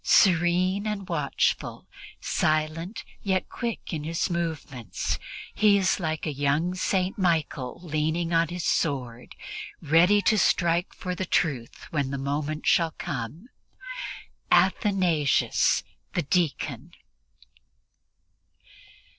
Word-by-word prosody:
Serene 185 +3 +4
and 205 -3 -3
watchful, 150 -6 -1 0.3
silent 155 +6 -1 0.2
yet 190 -2 0
quick 235 -6 -4
in 155 -2 -3
his 165 +3 -1
movements, 145 - -3 0.3
he 210 -1 +5
is 190 0 +2
like 160 -3 -2
a 155 - -2
young 145 +5 +1
St. 185 +1 0
Michael 160 -8 0
leaning 160 +1 -1
on 165 0 +4
his 175 +1 -5
sword, 125 -6 -1 0.4
ready 170 +6 +5
to 215 +2 +4
strike 170 0 +2
for 180 -1 -5
the 185 0 -3
truth 140 -12 -1
when 140 -4 0
the 140 - -3
moment 145 +3 -2
shall 165 -2 +3
come 145 - -5 1.0
Athanasius 175 -9 +3 0.3
the 175 - 0
deacon. 170 +1 -1
165 Hz, 105 wpm, -26 LUFS, 150-185 Hz, 1.0 s, he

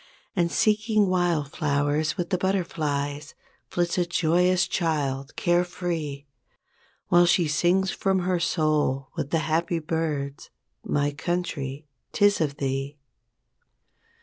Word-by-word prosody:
And, 170 -3 +1
seeking 215 -1 +2
wild 175 -6 +1
flowers 145 +1 0
with 175 +1 -3
the 185 - +2
butterflies 150 -6 -2 0.3
Flits 175 0 -1
a 175 - +2
joyous 175 +2 +2
child, 140 -5 -1
care 175 +1 +2
free; 165 -6 -4 0.8
While 175 0 +6
she 175 -1 +3
sings 180 +5 +2
from 190 -1 0
her 180 0 0
soul 155 -5 0
with 140 - -3
the 165 - +1
happy 165 +2 0
birds, 150 -3 -3 0.3
"My 145 0 0
Country 150 -3 -3 0.3
'Tis 205 -2 +3
of 145 -2 -1
Thee". 135 +1 -3
165 Hz, 120 wpm, -25 LUFS, 145-180 Hz, 0.8 s, While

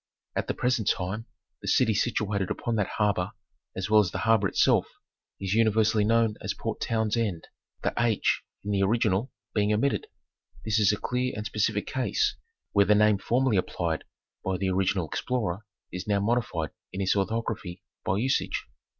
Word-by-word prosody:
At - - -1
the - - -1
present 125 -4 0
time 105 +6 -1 0.3
the - - -8
city 115 -4 +4
situated 105 -3 0
upon 120 -2 -2
that 105 - -1
harbor, 100 -4 +1 0.4
as 95 0 -2
well 105 0 +6
as 95 - 0
the - - -4
harbor 110 -3 +4
itself, - - +3 0.5
is 95 0 -1
uni 115 0 +4
versally 110 0 +3
known 115 0 +2
as - - -3
Port - - -4
Townsend, 110 -5 0 0.4
the - - 0 0.5
"/ - - -35
" - - -49
in 105 - -3
the 100 -1 +1
original 105 +2 +1 0.2
being 105 -1 +2
omitted. 115 +7 +1 0.6
This 110 0 +2
is 105 -2 +5
a 105 - -1
clear 125 +3 -1
and 105 0 -4
specific 105 -1 0
case, 130 - 0 0.4
where 100 -1 +4
the 105 +2 +5
name 105 -1 +4
form 120 +6 +1
ally 115 -6 +3
applied 85 -3 -1 0.4
by 95 -1 -1
the 95 0 0
original 95 -2 +1
explorer 110 -1 -2 0.2
is 90 +2 -6
now 100 -1 +2
modified 100 -7 0 0.2
in 95 - -6
its 95 0 +2
orthography 100 -3 -2 0.2
by 95 - 0
usage. 130 +5 0
105 Hz, 175 wpm, -27 LUFS, 95-115 Hz, 0.6 s, well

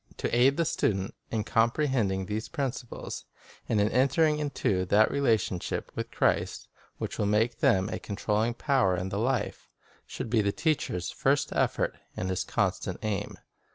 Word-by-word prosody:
To - - -1
aid 130 +3 +4
the 170 - +2
student 95 -8 0 0.2
in 110 -2 -1
comprehending 115 -5 +1
these 105 +3 -4
principles, 130 -3 -4 0.4
and 110 - +2
in 105 +1 +3
entering 150 +5 +3
into 120 -10 0
that 105 +4 +4
relation 110 -10 +1 0.3
with - - -4
Christ - - 0 0.3
which - - -5
will 105 - +2
make 110 +3 +1
them 95 0 +3
a - - -4
con 100 - -6
trolling 110 +3 0
power 130 -10 +2
in 95 +2 -3
the 100 - -2
life, 120 -2 -1 0.4
should 110 - -6
be 115 -3 +4
the 100 -1 +1
teacher's 130 - -1
first - - +1
effort - - 0 0.2
and 95 +1 -2
his 95 - -1
constant - - -1
aim. 105 -3 -2
110 Hz, 160 wpm, -28 LUFS, 100-130 Hz, 0.4 s, aid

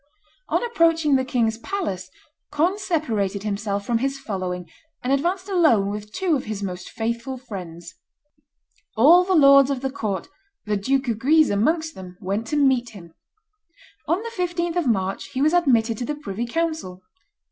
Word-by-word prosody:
On - - +1
approaching 330 - +3
the 260 - +2
king's 230 -3 0
palace 235 - -4 0.4
Conde 355 +7 +1
separated 225 - -1
himself 200 -1 -2
from 230 0 +1
his 270 +2 -1
following, 185 -8 -4 0.4
and 255 +2 +1
advanced 355 +7 0
alone 310 - +3
with 210 0 -7
two 370 - 0
of 265 - -3
his 215 -2 -5
most 180 -2 -5
faithful 235 +3 -3
friends. 175 -8 -9 1.0
All 325 +10 +7
the 375 0 +1
lords 275 -3 +7
of 270 -3 -2
the 270 -1 -2
court, 205 -8 -3 0.4
the 210 0 0
Duke 265 +7 0
of 225 -2 -1
Guise 310 +4 +4
amongst 315 +10 +1
them, 180 -1 -11
went 205 +3 -3
to 300 - -2
meet 265 -4 +2
him. 170 -4 -12 0.9
On 350 +6 0
the 465 - -6
15th 350 -2 -1
of 345 -6 0
March 195 -4 0
he 260 - -2
was 310 +2 +3
admitted 235 -10 +2
to 245 - -2
the 300 - -3
privy 235 -5 -5
council. 315 - -3
255 Hz, 170 wpm, -23 LUFS, 205-320 Hz, 1.0 s, All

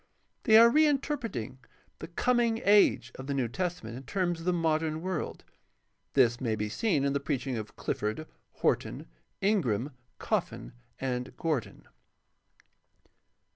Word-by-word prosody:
They 220 -2 +7
are 230 +1 +9
reinterpreting 275 - 0 0.4
"the - - -7
Coming 235 +5 +1
Age" 200 -11 +4
of 130 - -7
the 140 - -1
New 130 -3 0
Testament 165 -5 -4
in 130 - -7
terms 175 +4 -1
of 165 - -9
the - - +4
modern 160 -2 0
world. 185 -4 -3 0.7
This 120 -2 +4
may 115 -4 0
be 105 0 -3
seen 150 - +1
in 140 - +1
the 140 - +1
preach 140 -2 -2
ing 130 -2 -2
of 110 -2 -6
Clifford, 110 +9 -3 0.3
Horton, - - -1 0.4
Ingram, 145 - +1 0.3
Coffin, - - -2 0.3
and 125 -1 -3
Gordon. 155 -8 -3
155 Hz, 135 wpm, -29 LUFS, 125-190 Hz, 0.7 s, are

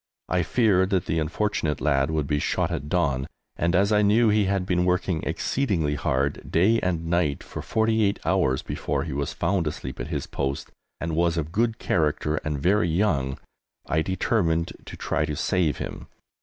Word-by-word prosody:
I 90 0 +2
feared 95 -2 +2
that 95 -4 +1
the 80 - 0
unfortunate 80 -1 -1
lad 70 -2 +2
would 80 -2 0
be 75 0 0
shot - - 0
at 70 +1 -4
dawn, 70 -7 +1 0.3
and 85 +1 +1
as 100 +3 +3
I 105 0 +4
knew 110 +3 +4
he 105 -1 +3
had 95 -1 0
been 90 -1 +1
working 90 -2 0
exceedingly 90 - 0
hard, 70 0 -1
day 105 +7 +4
and 85 -2 -1
night, 85 -4 0
for - - -7
48 110 -2 +1
hours 85 -8 +1
before - - -2
he 80 -4 -5
was 70 +3 -2
found 90 -1 0
asleep 65 -3 -5
at - - -4
his - - -3
post, 70 0 -3 0.3
and 85 -1 -2
was 85 0 +2
of 80 -1 -2
good 115 +3 +1
character 75 -2 0
and 75 -1 -2
very 90 +3 +2
young, 80 -7 +1 0.5
I 80 - +1
determined 85 -2 0
to - - -9
try - - -1
to 75 - -2
save 85 -2 +1
him. - - -6
85 Hz, 185 wpm, -25 LUFS, 75-95 Hz, 0.5 s, I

